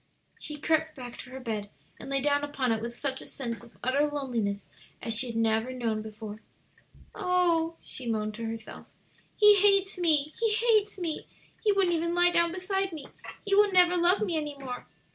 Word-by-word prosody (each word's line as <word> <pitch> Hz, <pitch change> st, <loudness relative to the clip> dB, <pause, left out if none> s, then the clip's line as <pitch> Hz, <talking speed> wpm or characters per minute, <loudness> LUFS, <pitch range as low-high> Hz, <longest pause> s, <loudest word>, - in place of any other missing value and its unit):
She 300 Hz, -, -5 dB
crept 315 Hz, +1 st, +1 dB
back 245 Hz, -2 st, -9 dB
to -, -, -9 dB
her 260 Hz, +1 st, -8 dB
bed, 215 Hz, -5 st, -4 dB, 0.3 s
and -, -, -8 dB
lay 275 Hz, 0 st, +1 dB
down 285 Hz, +1 st, +2 dB
upon 275 Hz, -4 st, -1 dB
it 220 Hz, -1 st, 0 dB
with 235 Hz, +1 st, -6 dB
such 270 Hz, -2 st, -2 dB
a -, -, -8 dB
sense 235 Hz, -4 st, -4 dB
of 235 Hz, -, -17 dB
utter 275 Hz, +4 st, +2 dB
loneliness 235 Hz, -9 st, -2 dB, 0.3 s
as 230 Hz, -1 st, -2 dB
she 250 Hz, +4 st, +1 dB
had 230 Hz, -, -6 dB
never 225 Hz, +2 st, +1 dB
known 230 Hz, -4 st, -2 dB
before. 215 Hz, 0 st, -8 dB, 0.7 s
"Oh," 355 Hz, -4 st, +1 dB
she 255 Hz, -, -7 dB
moaned 215 Hz, -1 st, -1 dB
to 230 Hz, +1 st, -5 dB
herself, 225 Hz, 0 st, -7 dB, 0.5 s
"he 420 Hz, -1 st, +7 dB
hates 395 Hz, -1 st, +3 dB
me, 305 Hz, -3 st, +2 dB
he 450 Hz, -2 st, +2 dB
hates 430 Hz, -2 st, +2 dB
me! 335 Hz, -4 st, -4 dB, 0.4 s
he 425 Hz, -, +4 dB
wouldn't 390 Hz, -3 st, +2 dB
even 335 Hz, +1 st, 0 dB
lie 350 Hz, 0 st, +5 dB
down 340 Hz, -1 st, +3 dB
beside 385 Hz, +1 st, -1 dB
me! 305 Hz, -4 st, -7 dB, 0.4 s
he 400 Hz, -, -1 dB
will 410 Hz, 0 st, +5 dB
never 360 Hz, -1 st, +5 dB
love 355 Hz, +2 st, +3 dB
me 370 Hz, -6 st, 0 dB
any 295 Hz, -2 st, -4 dB
more." 255 Hz, -3 st, -7 dB
295 Hz, 195 wpm, -28 LUFS, 235-360 Hz, 0.7 s, he